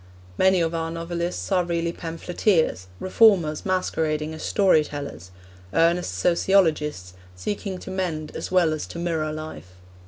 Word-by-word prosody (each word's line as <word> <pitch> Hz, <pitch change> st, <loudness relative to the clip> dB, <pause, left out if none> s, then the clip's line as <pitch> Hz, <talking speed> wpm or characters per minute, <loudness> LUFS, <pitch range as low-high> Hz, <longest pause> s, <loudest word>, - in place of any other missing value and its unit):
Many 190 Hz, -, +4 dB
of 165 Hz, 0 st, 0 dB
our 165 Hz, 0 st, -2 dB
novelists 170 Hz, +3 st, -4 dB
are 185 Hz, -2 st, +3 dB
really 170 Hz, -1 st, -1 dB
pamphleteers, 165 Hz, -, 0 dB
reformers 185 Hz, -6 st, +3 dB
masquerading 160 Hz, -4 st, -1 dB
as 160 Hz, -, -8 dB
story 190 Hz, -6 st, +3 dB
tellers, 140 Hz, -, -7 dB, 0.5 s
earnest 165 Hz, -, +2 dB
sociologists 155 Hz, -, +2 dB, 0.2 s
seeking 195 Hz, -, -4 dB
to 190 Hz, -, -8 dB
mend 165 Hz, -5 st, -3 dB
as -, -, -4 dB
well 175 Hz, -4 st, +3 dB
as 155 Hz, -, -4 dB
to -, -, -8 dB
mirror 165 Hz, -3 st, -1 dB
life. 155 Hz, -, -8 dB
165 Hz, 135 wpm, -24 LUFS, 155-180 Hz, 0.5 s, Many